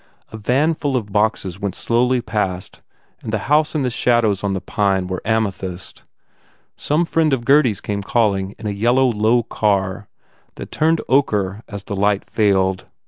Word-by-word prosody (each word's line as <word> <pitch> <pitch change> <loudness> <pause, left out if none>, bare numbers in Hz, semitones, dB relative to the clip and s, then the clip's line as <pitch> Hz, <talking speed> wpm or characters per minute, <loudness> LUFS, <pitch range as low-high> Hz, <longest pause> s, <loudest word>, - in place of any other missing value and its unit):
A 110 - -7
van 130 +9 +1
full 145 -4 -1
of 105 -4 -5
boxes 105 -3 0
went 100 -2 -3
slowly 125 +2 +1
past 105 -5 -3 0.4
the 110 0 -2
house 150 +9 +1
and 145 -3 0
the 125 - -1
shadows 115 -5 +1
on 100 -1 0
the 95 - -2
pine 95 -1 0
were 90 0 -4
amethyst. 100 -5 -3 0.7
Some 155 +4 0
friend 160 -2 +1
of 120 -3 -1
Gurdy 140 -2 +5
s 105 - -5
came 100 -1 -3
calling 100 -2 0
in 110 - -11
a 105 - -1
yellow, 120 +6 +2
low 110 +2 +2
car 100 -3 -1 0.5
that - - -9
turned 160 +1 +1
ochre 105 -7 +1
as 100 -1 -7
the 100 - -5
light 100 0 0
failed. 95 -3 +1
105 Hz, 170 wpm, -19 LUFS, 100-125 Hz, 0.7 s, Gurdy